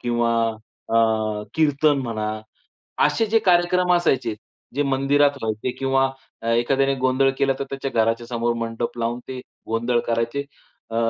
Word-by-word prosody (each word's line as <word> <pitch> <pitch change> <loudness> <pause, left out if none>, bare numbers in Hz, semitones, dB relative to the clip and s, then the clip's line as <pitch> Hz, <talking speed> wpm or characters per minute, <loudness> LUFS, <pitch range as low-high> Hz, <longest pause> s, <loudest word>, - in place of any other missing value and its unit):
किंवा 120 -1 +1 0.5
अ, 110 -2 +1
कीर्तन 150 -1 +3
म्हणा, 110 -2 -3 0.7
असे 225 - +2
जे 225 +1 +3
कार्यक्रम 180 0 +3
असायचे 130 -10 +1 0.4
जे 145 - +2
मंदिरात 140 +1 +3
व्हायचे 110 +3 -2
किंवा 135 0 +2 0.4
एखाद्याने 135 +4 +2
गोंधळ 130 +1 +3
केला 135 -1 +2
तर - - -1
त्याच्या 135 0 -3
घराच्या 115 +1 +1
समोर 120 0 0
मंडप 115 +1 -3
लावून 120 +1 -1
ते 130 -1 -6 0.3
गोंधळ 120 +2 +1
करायचे. 115 +4 0 0.5
अ, 115 - -6
125 Hz, 135 wpm, -22 LUFS, 115-140 Hz, 0.7 s, कीर्तन